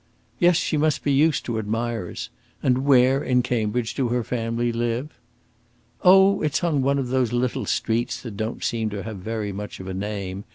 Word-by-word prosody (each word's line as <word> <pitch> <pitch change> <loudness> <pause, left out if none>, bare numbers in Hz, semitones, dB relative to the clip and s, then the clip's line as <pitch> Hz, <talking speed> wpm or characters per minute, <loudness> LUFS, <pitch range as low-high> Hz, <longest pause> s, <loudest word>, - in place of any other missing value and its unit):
"Yes; 175 -2 +5
she 155 - 0
must 155 -1 +1
be 145 - +1
used 150 +2 +2
to 115 -2 -2
admirers. 110 -3 -3 0.3
And 125 0 +3
where, 135 0 +4
in 125 -1 +2
Cambridge, 115 -1 -1
do 130 -3 0
her 120 0 0
family 115 0 -1
live?" 120 +5 -2 0.9
"Oh, 190 +2 +6
it's 155 +2 0
on 155 -5 +1
one 140 +1 +2
of 130 -3 -2
those 130 -3 +1
little 120 0 -1
streets 115 +2 -1
that 115 -5 -7
don't 110 +3 -4
seem 115 -2 -1
to 100 -1 -5
have 110 -2 -6
very 105 +1 -4
much 105 +2 -7
of 95 - -8
a 95 - -4
name. 100 0 -4
120 Hz, 190 wpm, -24 LUFS, 110-135 Hz, 0.9 s, Oh